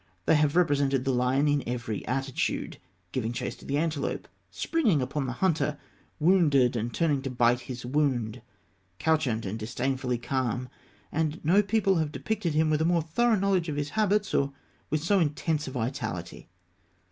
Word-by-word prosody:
They - - +4
have 150 -1 +3
represented 140 -6 +2
the 135 - +2
lion 125 +4 +2
in 145 -1 +2
every 115 -4 -3
attitude 135 +1 -2 0.3
giving 115 -3 -2
chase 125 0 -3
to - - -15
the 140 - -1
antelope; 155 -2 -2 0.2
springing 240 - +1
upon 135 +2 -2
the - - -2
hunter; 160 -2 0 0.4
wounded, 150 -8 +4
and 115 +1 -2
turning 150 -3 +1
to 135 - -4
bite 120 -1 +3
his 125 -2 -7
wound; 125 -4 0 0.6
couchant, 140 -9 +1
and 100 +4 -4
disdainfully 125 +3 -1
calm 125 0 -2 0.4
and 160 +1 -1
no 185 +6 +5
people 200 -2 +2
have 155 -2 0
depicted 185 -2 -2
him 155 0 +3
with 155 0 +2
a - - +3
more 170 -1 +2
thorough 230 +9 +2
knowledge 190 -4 +1
of 150 - -2
his 145 0 -2
habits, 210 -1 +1
or 140 0 +2 0.4
with 155 0 -1
so 195 +3 +3
intense 155 -1 0
a - - -4
vitality. 110 -10 -4
145 Hz, 170 wpm, -28 LUFS, 125-165 Hz, 0.6 s, no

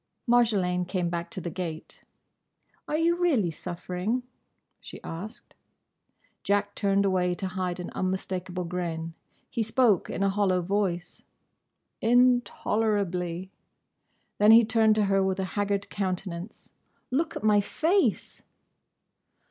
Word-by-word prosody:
Marjolaine 205 -7 +3
came 180 -1 -2
back 170 0 -3
to 225 - -6
the 175 -1 -5
gate. 165 -2 -6 0.9
"Are 300 - 0
you 335 +2 +2
really 275 - +2
suffering?" 180 +8 -3 0.6
she - - -10
asked. 185 +7 -8 0.9
Jack 205 0 +1
turned 200 -1 +1
away 180 -2 +1
to 190 - -4
hide 185 -1 -3
an 180 - -6
unmistakable 185 -1 -3
grin. 170 -2 -4 0.4
He 235 - -1
spoke 225 -2 +2
in 195 - -2
a 200 - +3
hollow 190 -2 +1
voice. 180 -2 -2 0.8
"Intolerably." 210 -7 +1 0.9
Then 210 +1 +5
he 225 +1 +8
turned 220 -1 +3
to 215 -1 +2
her 195 0 +2
with 190 0 0
a - - 0
haggard 200 -1 -1
countenance. 185 -1 -4 0.4
"Look 320 +5 0
at - - -5
my 210 -1 +4
face!" 340 - 0
195 Hz, 125 wpm, -27 LUFS, 180-220 Hz, 0.9 s, he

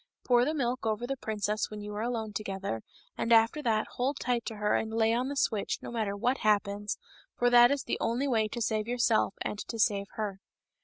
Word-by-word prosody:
Pour 245 -1 +4
the 305 - 0
milk 255 -3 -1
over 220 +1 -1
the 270 +2 -2
princess 215 -3 -2
when 210 - -7
you 210 0 -6
are 210 - -3
alone 225 -2 -2
together, 195 - -3 0.4
and 230 - -1
after 230 +6 +5
that 220 -4 +1
hold 265 +3 0
tight 245 -2 0
to 225 - -4
her 210 0 0
and 220 - 0
lay 225 0 +2
on 250 +3 0
the 285 - -4
switch, 220 -6 0
no - - -6
matter 215 -4 -2
what 250 +6 +1
happens, 205 -1 +1 0.4
for 245 0 +3
that 240 0 +8
is 280 -1 0
the - - -2
only 245 +5 0
way 225 -5 +2
to 235 +2 -3
save 215 0 -1
yourself 235 -4 +2
and 205 - -4
to 230 - -5
save 200 -2 +2
her." 205 -3 -4
225 Hz, 220 wpm, -30 LUFS, 210-245 Hz, 0.4 s, that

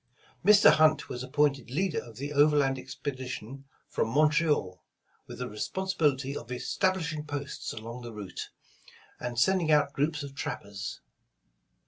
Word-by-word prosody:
Mr. 205 -4 +8
Hunt 155 0 +4
was 125 - -5
appointed 135 -1 +1
leader 165 +6 0
of 115 -2 -13
the 145 +3 -4
overland 145 -2 +4
expedi 130 0 -5
tion 130 +3 -7 0.2
from - - -1
Montreal, 150 - +2 0.4
with - - -8
the 125 - -3
responsibility 140 - -1
of 120 -2 -7
establish 165 +6 0
ing 150 -1 -5
posts 145 -1 -4
along 115 +3 -7
the 120 -1 -7
route, 105 -4 -7 0.7
and 120 -1 -4
sending 170 +4 +3
out 145 -2 +4
groups 150 +1 0
of 140 -1 -7
trappers. 100 -7 -5
140 Hz, 140 wpm, -29 LUFS, 125-155 Hz, 0.7 s, Mr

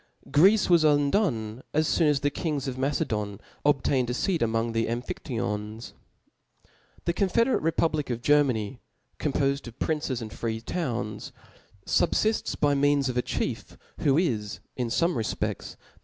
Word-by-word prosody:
Greece 195 +8 +5
was 170 -3 +5
undone 145 - +2
as 155 0 +2
loon 160 -3 +5
as 140 -2 +1
the 145 - +1
•kings 145 -3 -2
of 130 - -3
Mace 135 +2 0
ddn 105 -2 -2 0.2
obtained 135 -3 +2
a 125 - -1
feat 175 +4 0
among 115 0 +1
the 115 0 0
Ara; 120 +1 -1
■.phiAyons... 110 -3 -4 1.1
The 170 - +1
confederate 230 +7 +2
republic 160 -2 0
of 120 -1 -3
Germany, 130 -5 +2 0.4
compofed 140 -2 0
of 120 +1 -10
princes 150 -5 -1
and 110 -2 -7
free 115 -1 -3
towns, 115 - -3 0.5
fubfifts 215 +6 +1
by 145 -1 +3
Gieans 140 -1 +2
of 125 - -3
^ 125 - +1
chief, - - -3 0.2
who 135 - +3
isj 115 - 0 0.2
io 125 - +1
fome 170 +9 +1
refpedls, 115 -4 -3
the - - -28
135 Hz, 155 wpm, -27 LUFS, 115-155 Hz, 1.1 s, Greece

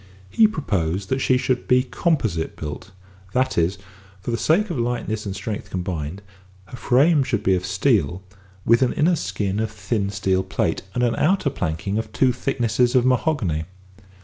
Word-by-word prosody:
He 220 - +5
proposed 95 - -2
that 130 - 0
she 130 -1 +3
should 125 -1 -1
be 125 0 +4
composite 120 - -1
built; 75 +5 -7 0.4
that 130 +1 +1
is, 85 +3 +1
that - - -21 0.4
for 120 - -4
the - - +1
sake 180 - +2
of 150 - -2
lightness 115 -3 -2
and 95 - -4
strength 100 +2 -5
combined, 90 0 -4 0.4
her 95 - -10
frame 140 +7 +4
should 120 -5 -1
be 95 - +3
of 90 0 -1
steel, 90 - +1 0.4
with 115 +2 +4
an 130 - +2
inner 170 +4 +3
skin 95 - -2
of 110 0 -1
thin 105 0 -2
steel 95 -2 0
plate, 95 - -1
and 125 - +1
an 120 -1 +2
outer 180 -3 +2
planking 95 +4 -2
of 110 -1 -5
two 130 +3 +2
thicknesses 125 -1 0
of 125 -1 +4
mahogany. 120 - +1
110 Hz, 175 wpm, -22 LUFS, 95-130 Hz, 0.4 s, He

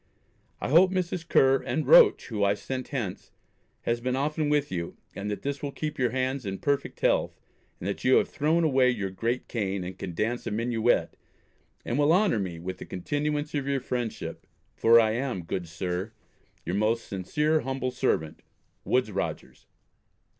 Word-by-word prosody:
I - - -3
hope 170 +6 +6
Mrs. 180 -2 -2
Ker 135 0 +4
and 155 - -2
Roach 485 - +6
who 105 -4 -1
I 100 0 +3
sent 130 +5 -5
hence 115 -10 -4 0.5
has 120 0 -1
been 125 +1 -1
often 150 +2 0
with 145 -1 +1
you, 85 -2 -4 0.2
and 100 +1 -5
that 105 - -4
this 140 0 -3
will 145 - -3
keep 150 0 -5
your 125 -2 +2
hands 130 +2 -1
in 95 -2 -4
perfect 140 +4 -1
health - - +1 0.4
and 90 - -5
that 100 - -3
you 130 - +5
have - - +4
thrown 160 +3 +1
away 135 -5 +4
your 100 -6 -2
great 115 +6 -2
cane, 100 -5 -2
and 90 +1 -7
can 90 -3 -5
dance 115 +5 -1
a - - 0
minuet, 115 +1 +1 0.7
and 120 - -1
will 145 +1 +4
honour 185 - +3
me 90 -4 -4
with 95 +2 -6
the - - -7
continuance 145 +9 -2
of 140 -2 -2
your 140 -1 +1
friendship, 120 -3 -4 0.3
for 115 +1 +6
I 110 -1 +3
am, 120 -5 -2
good 85 +1 -4
Sir, 90 +5 -4 0.5
Your 90 +4 -1
most 110 +2 +1
sincere 150 - 0
humble 130 -2 -2
servant, 125 -12 -1 0.4
WOODES 125 -3 +1
ROGERS. 100 - -5
125 Hz, 180 wpm, -27 LUFS, 100-145 Hz, 0.7 s, hope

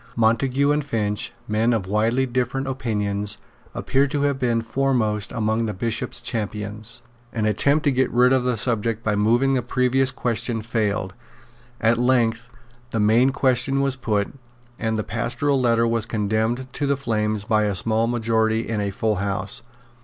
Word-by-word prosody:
Montague 125 +5 +2
and 150 0 +1
Finch, 105 -6 -2 0.2
men 110 +3 +2
of 110 -5 -1
widely 110 +6 +1
different 130 +1 -1
opinions, 105 -6 -2 0.4
appear 135 +1 +1
to 145 0 -1
have 140 -2 +1
been 120 -3 +1
foremost 115 -4 0
among 110 -1 0
the 105 - -4
Bishop's 115 +3 -3
champions. 105 -1 -4 0.3
An 110 -3 -1
attempt 140 +8 +2
to 145 - +3
get 130 -1 +1
rid 125 +2 +4
of 130 -1 +2
the 125 -2 0
subject 115 -1 -1
by 105 -1 +1
moving 120 +6 +3
the 130 - +2
previous 125 +2 +1
question 120 -2 -2
failed. 105 -5 -1 0.7
At 115 +1 +2
length 120 -2 +1 0.4
the 115 - -2
main 110 +5 +4
question 135 0 +2
was 135 -1 +1
put; 105 -5 -1 0.5
and 110 -1 -1
the 110 - -1
Pastoral 135 +5 0
Letter 115 -1 +3
was 115 -1 -1
condemned 110 +4 -1
to 145 - -1
the 140 0 +1
flames 110 -5 -1
by 105 -1 +2
a 100 -2 -1
small 110 +4 +1
majority 110 -1 +1
in 110 -2 -1
a 100 - -1
full 105 +1 -1
house. 100 0 -2
115 Hz, 165 wpm, -23 LUFS, 110-130 Hz, 0.7 s, rid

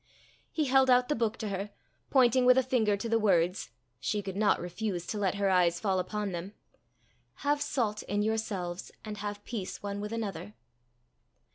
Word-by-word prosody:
He 310 - 0
held 265 0 +4
out 250 +1 +5
the 295 - +2
book 225 -1 0
to 215 - -4
her, 200 +1 -3 0.4
pointing 255 -1 +4
with 250 +1 +6
a 260 - +5
finger 225 -5 +2
to 215 - -4
the 230 0 +2
words 185 -3 +2 0.3
she 210 -1 -1
could 190 -1 -5
not 205 0 +3
refuse 180 0 -3
to 210 - -3
let 195 -2 +1
her 200 0 +1
eyes 175 -2 +3
fall 195 -3 +1
upon 205 +2 -2
them 180 +4 -6 0.9
"Have 290 0 +2
salt 225 -7 -1
in 205 0 -1
yourselves, 200 -5 -2
and 210 -1 -5
have 205 0 -5
peace 190 -6 -5
one 200 0 -3
with 210 +1 -5
another." 200 - -4
210 Hz, 180 wpm, -30 LUFS, 190-230 Hz, 0.9 s, with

